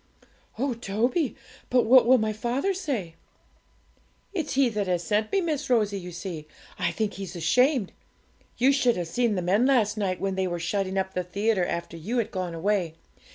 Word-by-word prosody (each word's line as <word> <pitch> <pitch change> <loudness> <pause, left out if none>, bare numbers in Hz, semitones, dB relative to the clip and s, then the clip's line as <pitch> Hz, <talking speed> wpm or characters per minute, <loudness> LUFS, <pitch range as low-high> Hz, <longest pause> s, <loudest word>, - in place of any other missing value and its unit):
'Oh, 265 +2 0
Toby! 240 - -1 0.3
but 250 -1 +3
what 250 +1 +6
will 260 +1 +7
my 220 -2 0
father 245 - -1
say?' 265 - -3 1.2
'It's 320 -8 -2
he 270 -1 +4
that 210 -4 -2
has 175 -1 0
sent 215 +2 0
me, 390 - +2
Miss 310 -7 -2
Rosie; 210 -5 +2
you 180 -1 -8
see, 170 -3 -6 0.3
I - - +1
think 215 -2 -2
he's 190 -2 -7
ashamed. 245 - +2 0.7
You 260 +3 +4
should 255 -5 +2
have 175 -2 -3
seen 235 +5 +1
the 180 - -2
men 200 +8 +3
last 225 -6 +2
night, 185 -3 -1
when 195 -1 -1
they 190 0 0
were 175 -1 -2
shutting 195 +2 -1
up 190 0 -1
the 180 - 0
theatre 200 +1 0
after 170 0 -4
you 210 +10 -3
had 230 -2 0
gone 180 -3 -3
away. 175 -2 0
210 Hz, 190 wpm, -26 LUFS, 185-250 Hz, 1.2 s, will